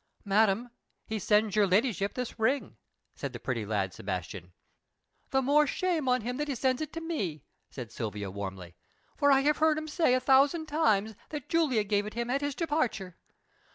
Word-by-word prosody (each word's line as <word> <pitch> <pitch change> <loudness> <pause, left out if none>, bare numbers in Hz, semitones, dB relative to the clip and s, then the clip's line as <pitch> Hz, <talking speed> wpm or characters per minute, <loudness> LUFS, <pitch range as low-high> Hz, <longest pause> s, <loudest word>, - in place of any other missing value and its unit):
"Madam, 215 +3 +2 0.3
he 220 0 -3
sends 210 +1 +2
your 210 -2 +4
ladyship 200 0 +1
this 250 -3 -5
ring," 260 +6 0 0.4
said 140 -2 -6
the 120 - -6
pretty 115 -3 -2
lad 100 -4 -1
Sebastian. 90 -1 -5 0.8
"The 265 0 +1
more 295 +3 +4
shame 345 -2 0
for 250 0 +3
him 245 +2 -4
that 295 +1 -2
he 280 - -2
sends 255 +2 0
it 310 +1 -5
me!" 300 - -3 0.3
said 120 -4 -8
Silvia 105 -4 -4
warmly. 95 -3 -6 0.4
"For 285 0 +3
I 270 0 +5
have 295 +2 +2
heard 315 -1 +3
him 310 0 -4
say 310 -5 +2
a - - +2
thousand 275 +5 +4
times 220 -9 +1 0.2
that 295 -4 -6
Julia 305 -10 +2
gave 205 0 0
it 215 - -8
him 235 +1 -2
at 275 +2 0
his 285 -1 -2
departure. 250 - -1
235 Hz, 185 wpm, -29 LUFS, 180-285 Hz, 0.8 s, I